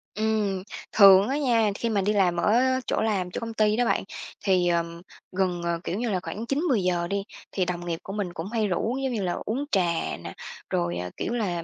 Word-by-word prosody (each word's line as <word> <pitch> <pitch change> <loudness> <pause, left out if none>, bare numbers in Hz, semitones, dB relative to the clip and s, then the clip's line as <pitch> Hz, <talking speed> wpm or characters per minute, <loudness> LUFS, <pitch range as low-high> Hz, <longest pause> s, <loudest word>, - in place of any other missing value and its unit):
Ừm, 215 -3 0 0.3
thường 195 -1 +8
á 275 - 0
nha, 230 -7 +2
khi 230 +2 -2
mà 205 -3 +1
đi 205 +2 +1
làm 185 -4 +3
ở 210 +5 +3 0.3
chỗ - - 0
làm 195 -5 0
chỗ - - -3
công 230 -1 -5
ty 215 -1 +2
đó 245 - +2
bạn, - - +1 0.4
thì, 185 -2 +3
ờm, 170 0 -1 0.3
gần, 185 -2 0
ờ, 170 -1 -1
kiểu 185 - -3
như 235 -1 -1
là, 190 - 0
khoảng 220 +3 -5
9-10 275 - +1
giờ 175 -1 0
đi 200 +1 -1 0.3
thì 185 -2 0
đồng 175 -1 -4
nghiệp 165 -1 -3
của 195 - -7
mình 200 -4 -3
cũng 170 +1 -5
hay 220 -3 +1
rủ, 220 +7 -1
giống 265 - -1
như 220 - -1
là, 175 - 0
uống 265 +7 -2
trà 195 - +4 0.4
nè, - - -6 0.4
rồi, 85 0 -1
ờ, 90 0 -4
kiểu 235 - -2
là, 185 -8 -1
195 Hz, 230 wpm, -26 LUFS, 175-220 Hz, 0.4 s, thường